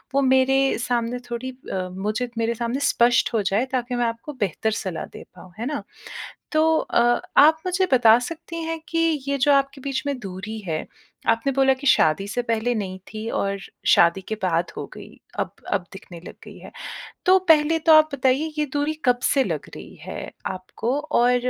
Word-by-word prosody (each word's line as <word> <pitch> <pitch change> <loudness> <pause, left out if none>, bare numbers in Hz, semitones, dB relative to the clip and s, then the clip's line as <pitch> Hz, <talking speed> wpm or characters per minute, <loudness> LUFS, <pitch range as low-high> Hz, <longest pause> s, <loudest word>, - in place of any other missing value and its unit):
वो 275 - +4
मेरे 265 0 +4 0.2
सामने 245 0 -1
थोड़ी 255 +2 -4 0.2
अ, 185 -1 -2
मुझे 215 +6 -3
मेरे 230 +1 0
सामने 235 +4 -2
स्पष्ट 235 0 +3
हो 220 - +2
जाए 200 +6 +1
ताकि 250 -1 -2
मैं 240 -1 +1
आपको 230 +6 -4
बेहतर 205 +3 -1
सलाह 185 -4 -4
दे - - -9
पाऊँ, 180 -2 -14
है 235 - -3
ना? 290 +1 -3 0.7
तो 315 +1 +3
अ, - - 0 0.4
आप 315 +2 +7
मुझे 365 +1 +1
बता 235 -2 +6
सकती 330 +5 -6
हैं 325 0 -3
कि 330 - -2 0.3
ये 280 0 0
जो 285 +2 +4
आपके 275 0 +1
बीच 270 -1 -3
में 280 -2 -1
दूरी 195 +3 -6
है, 160 -5 -4 0.4
आपने 230 +4 +2
बोला 270 0 +4
कि 285 - -6
शादी 195 - +3
से 245 +3 -2
पहले 230 +1 0
नहीं 190 -3 -4
थी 215 +1 -5
और 200 0 -1 0.3
शादी 170 +3 +5
के 220 - -1
बाद 170 -1 0
हो - - -5
गई, - - -11 0.3
अब - - -2 0.2
अब 190 -3 +1
दिखने 180 -3 -11
लग - - -9
गई - - -12
है। - - -12 0.6
तो 375 +1 +7
पहले 315 +1 +5
तो 320 0 +4
आप 310 0 +7
बताइए 275 +4 +1
ये 300 - +1
दूरी 290 +2 0
कब 245 -1 +3
से 270 -2 +3
लग - - -4
रही - - -11
है - - -7 0.2
आपको 225 +8 -3 0.2
और 245 +1 +4
245 Hz, 195 wpm, -23 LUFS, 215-280 Hz, 0.7 s, आप